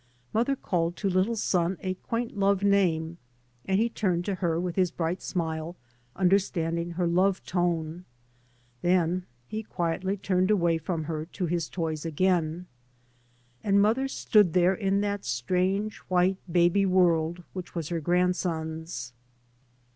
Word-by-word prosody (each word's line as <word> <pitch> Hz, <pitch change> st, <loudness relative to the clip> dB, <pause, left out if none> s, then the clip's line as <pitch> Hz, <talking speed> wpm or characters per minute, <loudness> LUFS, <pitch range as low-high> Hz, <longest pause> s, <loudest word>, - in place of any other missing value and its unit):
Mother 240 Hz, +5 st, +2 dB
called 175 Hz, -8 st, -1 dB
to 200 Hz, -, -1 dB
little 185 Hz, +6 st, +2 dB
son 180 Hz, -4 st, 0 dB
a 185 Hz, -1 st, -1 dB
quatnt 230 Hz, +5 st, -4 dB
love 200 Hz, -1 st, +2 dB
name, 175 Hz, -5 st, +2 dB, 0.5 s
and 190 Hz, 0 st, +1 dB
he 230 Hz, -, +3 dB
turned 185 Hz, -6 st, -1 dB
to 200 Hz, -, -1 dB
her 170 Hz, -3 st, 0 dB
with 175 Hz, -1 st, -3 dB
his 185 Hz, -2 st, +2 dB
bright 170 Hz, +1 st, -2 dB
smile, 160 Hz, -1 st, -3 dB, 0.4 s
understanding 175 Hz, -3 st, +1 dB
her 175 Hz, +1 st, 0 dB
love 185 Hz, +3 st, +2 dB
tone. 175 Hz, -1 st, -1 dB, 0.8 s
Then 180 Hz, 0 st, +1 dB, 0.2 s
he 215 Hz, -, -4 dB
quietly 185 Hz, 0 st, -2 dB
turned 185 Hz, -1 st, +1 dB
away 170 Hz, -5 st, +2 dB
from 160 Hz, 0 st, -3 dB
her 155 Hz, 0 st, -4 dB
to 185 Hz, +1 st, -3 dB
his 170 Hz, -2 st, -1 dB
toys 160 Hz, -4 st, -3 dB
again. 170 Hz, 0 st, 0 dB, 1.0 s
And 200 Hz, -1 st, +3 dB
mother 225 Hz, +6 st, +3 dB
stood 210 Hz, -9 st, +3 dB
there 180 Hz, +1 st, +4 dB
in 195 Hz, 0 st, 0 dB
that 205 Hz, -1 st, -2 dB
strange 185 Hz, -, 0 dB
white 185 Hz, +1 st, +2 dB
baby 175 Hz, +3 st, +3 dB
world 175 Hz, -2 st, +2 dB
which 185 Hz, -1 st, -7 dB
was 165 Hz, -3 st, -3 dB
her 170 Hz, -1 st, -1 dB
grandson's. 160 Hz, -6 st, -1 dB
180 Hz, 140 wpm, -27 LUFS, 165-195 Hz, 1.0 s, there